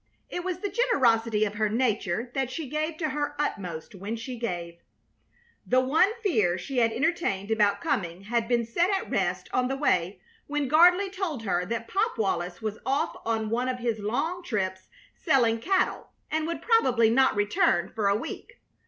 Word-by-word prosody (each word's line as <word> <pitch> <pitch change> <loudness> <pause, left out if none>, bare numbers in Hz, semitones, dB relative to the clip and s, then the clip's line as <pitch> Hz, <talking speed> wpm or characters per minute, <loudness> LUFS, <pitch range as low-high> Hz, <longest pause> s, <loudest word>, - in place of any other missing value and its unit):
It 355 - -3
was 365 -2 -2
the 405 - -2
generosity 230 - +2
of 205 - -3
her 215 0 0
nature 225 -1 -1
that 265 -2 -1
she 300 +3 -5
gave 310 +3 -2
to 315 -2 -1
her 290 +1 -2
utmost 185 - -3
when 200 +4 -5
she 240 +3 -6
gave. 175 -7 -5 0.8
The 255 - +3
one 280 +9 +3
fear 210 - +2
she 250 +8 -3
had 230 -1 +3
entertained 235 - -1
about 205 -2 +2
coming 175 -1 -2
had 230 +3 -1
been 240 -1 +1
set 340 +11 +1
at 390 -1 -1
rest - - -1
on 250 0 +2
the 270 - -2
way 185 - 0 0.3
when 295 -1 -1
Gardley 355 +6 +5
told 355 - -3
her 180 -3 0
that 230 +1 -3
Pop 410 - 0
Wallis 180 -2 -2
was 215 -1 -3
off 275 +6 0
on 220 -1 -1
one 245 +2 0
of 255 - -2
his 235 -3 -2
long 310 - -2
trips, 190 - -3 0.3
selling 230 -4 +2
cattle, 380 +9 0 0.2
and 315 0 0
would 335 - -4
probably 250 - +4
not 265 +1 +4
return 205 -4 +2
for 215 -3 0
a 200 - +3
week. - - -8
235 Hz, 180 wpm, -27 LUFS, 210-305 Hz, 0.8 s, Gardley